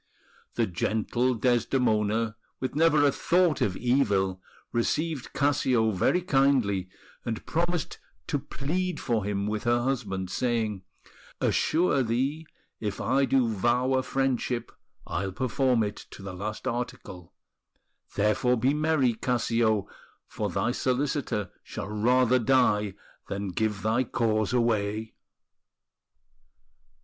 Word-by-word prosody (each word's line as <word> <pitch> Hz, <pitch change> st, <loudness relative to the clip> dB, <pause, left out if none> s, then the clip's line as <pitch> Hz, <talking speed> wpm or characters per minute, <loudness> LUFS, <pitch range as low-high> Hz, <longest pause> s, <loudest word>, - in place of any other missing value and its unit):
The -, -, +2 dB
gentle 110 Hz, +7 st, 0 dB
Desdemona, 115 Hz, -2 st, +1 dB, 0.2 s
with 130 Hz, -, -3 dB
never 155 Hz, -1 st, +4 dB
a 140 Hz, -, +5 dB
thought 175 Hz, +2 st, +2 dB
of 95 Hz, -2 st, +1 dB
evil, 100 Hz, -7 st, +1 dB, 0.3 s
received 150 Hz, +4 st, -1 dB
Cassio 130 Hz, -5 st, +2 dB
very 140 Hz, -, +1 dB
kindly, 130 Hz, -, +2 dB, 0.3 s
and 115 Hz, -2 st, -4 dB
promised 175 Hz, 0 st, -1 dB, 0.3 s
to 145 Hz, -, -1 dB
plead 170 Hz, +6 st, -3 dB
for 115 Hz, -4 st, 0 dB
him 100 Hz, 0 st, -1 dB
with 105 Hz, +1 st, -3 dB
her 120 Hz, 0 st, +2 dB
husband, 100 Hz, -8 st, -2 dB
saying: 115 Hz, -5 st, -1 dB, 0.3 s
"... -, -, -24 dB
Assure 155 Hz, -4 st, +2 dB
thee, 135 Hz, +7 st, -1 dB, 0.3 s
If 105 Hz, -2 st, -3 dB
I 135 Hz, +1 st, +2 dB
do 130 Hz, -3 st, +2 dB
vow 120 Hz, +4 st, +1 dB
a 130 Hz, -, +3 dB
friendship 130 Hz, -2 st, -1 dB, 0.3 s
I'll 95 Hz, +2 st, -3 dB
perform 130 Hz, 0 st, +1 dB
it 105 Hz, -1 st, -5 dB
To -, -, -11 dB
the 100 Hz, -1 st, -6 dB
last 105 Hz, +6 st, -5 dB
article... 120 Hz, -8 st, -5 dB, 0.8 s
Therefore, 105 Hz, +4 st, +2 dB
be 130 Hz, +5 st, +2 dB
merry, 150 Hz, -5 st, +2 dB
Cassio, 115 Hz, -3 st, +1 dB, 0.4 s
For -, -, -3 dB
thy 120 Hz, -, 0 dB
solicitor 130 Hz, -, -1 dB
shall 105 Hz, -3 st, -7 dB
rather 125 Hz, +4 st, +3 dB
die 105 Hz, -5 st, +2 dB, 0.3 s
Than 100 Hz, 0 st, -3 dB
give 105 Hz, +2 st, -1 dB
thy 115 Hz, +4 st, +2 dB
cause 110 Hz, -2 st, 0 dB
away!" 110 Hz, -3 st, 0 dB
120 Hz, 120 wpm, -27 LUFS, 105-135 Hz, 0.8 s, a